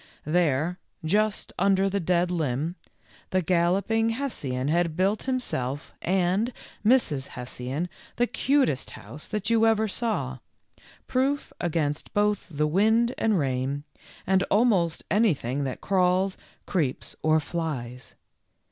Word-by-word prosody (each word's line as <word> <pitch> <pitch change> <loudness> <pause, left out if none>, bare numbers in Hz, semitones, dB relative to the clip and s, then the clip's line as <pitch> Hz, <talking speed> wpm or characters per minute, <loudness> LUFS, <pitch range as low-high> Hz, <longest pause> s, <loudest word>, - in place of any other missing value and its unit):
There, 165 +1 +1 0.3
just 210 +5 +1
under 195 +1 +3
the 200 +1 0
dead 175 0 +1
limb, 155 0 -1 0.5
the 185 -1 +1
Gallop 180 +4 +2
ing 225 0 +3
Hessian 150 - -2
had 165 +1 +1
built 195 +3 +2
himself 145 - -2
and 190 +6 +1 0.3
Mrs. 205 - +3
Hessian 125 +6 -4 0.3
the 240 - +3
cutest 265 - +1
house 125 +9 -9
that 210 +1 -2
you 225 -1 +5
ever 220 0 +3
saw, 180 - -2 0.7
proof 275 +3 0
against 155 -4 -1
both 210 0 +1
the 150 -2 0
wind 220 +9 +3
and 220 -3 +2
rain, 135 0 -1 0.4
and 190 0 +3
almost 200 -7 +2
anything 145 - +1
that 130 - -4
crawls, 185 0 +2 0.3
creeps, 155 -9 -1
or 155 0 +4
flies. 140 -7 -5
180 Hz, 120 wpm, -26 LUFS, 145-210 Hz, 0.7 s, you